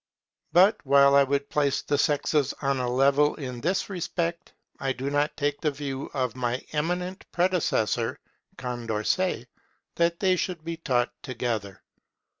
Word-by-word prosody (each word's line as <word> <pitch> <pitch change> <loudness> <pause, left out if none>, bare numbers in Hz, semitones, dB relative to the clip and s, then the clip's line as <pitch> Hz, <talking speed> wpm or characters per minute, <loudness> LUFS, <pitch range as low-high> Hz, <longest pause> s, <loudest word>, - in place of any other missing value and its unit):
But 190 +6 +5
while 140 0 +5
I 140 0 +7
would 140 +1 -1
place 140 -2 0
the 145 - 0
sexes 145 -1 +1
on 135 -2 0
a 125 -1 -1
level 140 +3 +3
in 125 -4 -6
this 185 +5 0
respect, 170 -2 -3 0.3
I 135 -1 -1
do 130 +3 -4
not 145 +1 0
take 145 -1 -1
the 155 - +2
view 140 -2 -5
of 130 -2 -1
my 125 0 -2
eminent 180 +5 -2
predecessor 175 - +1 0.4
Condorcet, 120 - -1 0.5
that 170 0 +2
they 185 -2 +3
should 175 -3 -3
be 165 0 -4
taught 125 -7 0
together. 115 -6 -4
140 Hz, 145 wpm, -26 LUFS, 130-170 Hz, 0.5 s, I